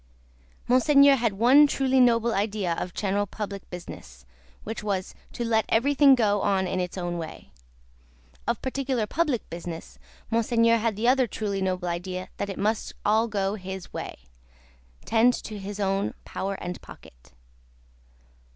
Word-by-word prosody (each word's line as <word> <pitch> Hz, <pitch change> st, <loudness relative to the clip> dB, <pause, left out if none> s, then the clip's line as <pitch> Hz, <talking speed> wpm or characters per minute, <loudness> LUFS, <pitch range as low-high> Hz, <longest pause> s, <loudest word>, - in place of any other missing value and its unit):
Monseigneur 280 Hz, +2 st, +6 dB
had 230 Hz, -5 st, 0 dB
one 255 Hz, +8 st, +6 dB
truly 265 Hz, -2 st, +1 dB
noble 235 Hz, -2 st, +4 dB
idea 200 Hz, -3 st, -1 dB
of 180 Hz, -, -4 dB
general 205 Hz, 0 st, 0 dB
public 200 Hz, -1 st, -6 dB
business, 65 Hz, -, -10 dB, 0.4 s
which 225 Hz, +1 st, -5 dB
was, 195 Hz, -2 st, -2 dB, 0.2 s
to 240 Hz, -, -4 dB
let 220 Hz, -1 st, +2 dB
everything 275 Hz, +3 st, +5 dB
go 205 Hz, -4 st, +2 dB
on 195 Hz, -2 st, +1 dB
in 185 Hz, 0 st, -2 dB
its 180 Hz, +1 st, -3 dB
own 175 Hz, -1 st, -3 dB
way; 160 Hz, -1 st, -8 dB, 1.0 s
of -, -, 0 dB
particular 260 Hz, -3 st, -1 dB
public 290 Hz, -1 st, -1 dB
business, 170 Hz, -1 st, -7 dB, 0.3 s
Monseigneur 230 Hz, 0 st, +3 dB
had 220 Hz, -1 st, 0 dB
the 220 Hz, +4 st, -1 dB
other 255 Hz, 0 st, +4 dB
truly 200 Hz, -2 st, -3 dB
noble 185 Hz, -1 st, -1 dB
idea 180 Hz, +2 st, -4 dB
that 200 Hz, -, -3 dB
it 195 Hz, -, -5 dB
must 215 Hz, +2 st, -1 dB
all 220 Hz, +2 st, +3 dB
go 200 Hz, -2 st, -1 dB
his 190 Hz, -2 st, -7 dB
way -, -, -6 dB, 0.9 s
tend 235 Hz, +2 st, +4 dB
to 215 Hz, -2 st, -7 dB
his 200 Hz, +1 st, -7 dB
own 195 Hz, 0 st, 0 dB
power 195 Hz, +1 st, -3 dB
and 180 Hz, -1 st, -6 dB
pocket. -, -, -16 dB
210 Hz, 150 wpm, -26 LUFS, 190-235 Hz, 1.0 s, Monseigneur